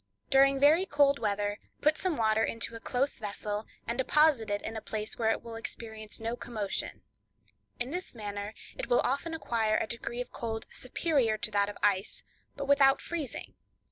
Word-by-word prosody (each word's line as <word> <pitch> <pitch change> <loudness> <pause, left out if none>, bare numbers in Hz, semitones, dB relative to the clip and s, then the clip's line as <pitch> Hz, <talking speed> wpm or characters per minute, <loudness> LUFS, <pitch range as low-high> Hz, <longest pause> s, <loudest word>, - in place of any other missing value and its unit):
—During 275 0 +6
very 315 +7 +5
cold 285 -2 +4
weather 205 -1 -1 0.2
put 305 +1 +4
some 365 -2 -1
water 220 -1 +3
into 230 0 -1
a 230 - -6
close 260 +4 0
vessel 210 0 -4 0.2
and 235 +2 -3
deposit 280 -4 +4
it 205 0 -1
in 225 - -5
a 220 - -4
place 215 0 -4
where 220 -1 +3
it - - 0
will 230 -1 -7
experience 220 -1 -5
no 225 +1 -2
commotion; 215 -5 -4 0.8
in 245 +3 -1
this 360 -5 -4
manner 205 -1 -5 0.2
it - - -4
will 245 - +4
often 300 +5 -1
acquire 225 -7 +1
a - - 0
degree 235 +1 -4
of 250 - -4
cold 225 -1 -4
superior 255 -4 +1
to 215 - -3
that 200 0 +2
of 205 - -7
ice, 200 -1 +2 0.3
but 280 - -4
without 275 -1 +6
freezing. 320 -6 -5
230 Hz, 180 wpm, -30 LUFS, 215-275 Hz, 0.8 s, During